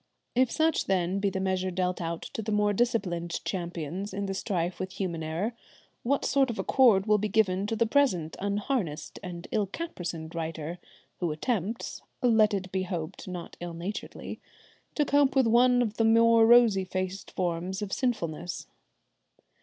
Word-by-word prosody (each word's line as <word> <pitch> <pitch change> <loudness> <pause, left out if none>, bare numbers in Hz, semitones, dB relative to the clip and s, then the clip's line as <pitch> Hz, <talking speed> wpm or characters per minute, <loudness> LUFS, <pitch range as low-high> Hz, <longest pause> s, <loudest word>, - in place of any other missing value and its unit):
If 255 0 +3
such, 320 +2 +1
then, 185 0 +1
be 200 0 +1
the 190 - -3
measure 190 -1 0
dealt 180 0 -1
out 165 0 -3
to - - -3
the 215 0 -3
more 210 0 +2
disciplined 190 -7 0
champions 175 +1 -4
in 200 0 -2
the 195 - -2
strife 180 -3 -2
with 185 0 -4
human 175 -5 -3
error, 165 +9 -2 0.5
what 275 +4 0
sort 270 -1 +3
of 230 - -3
accord 225 -8 +4
will 210 -1 +4
be 215 - 0
given 195 -2 +2
to 225 - -1
the 230 +1 +2
present 220 - +2
unharnessed 200 - -2
and 175 -3 -7
ill 210 -3 +1
caparisoned 175 - -5
writer, 165 0 -4 0.4
who 175 -3 0
attempts, 215 +6 -2 0.2
let 220 -3 +5
it 190 -2 -3
be 190 - 0
hoped 175 -3 -5
not 180 -2 -7
ill 175 -1 -6
naturedly, 180 +5 -6 0.6
to 295 - +2
cope 285 -1 +3
with 265 -2 +5
one 245 +2 +5
of 220 -2 -4
the 225 - +3
more 230 0 +6
rosy 230 -5 +6
faced 185 +1 -4
forms 180 +2 -2
of 195 - -4
sinfulness. 175 - -2
195 Hz, 170 wpm, -28 LUFS, 175-225 Hz, 0.6 s, more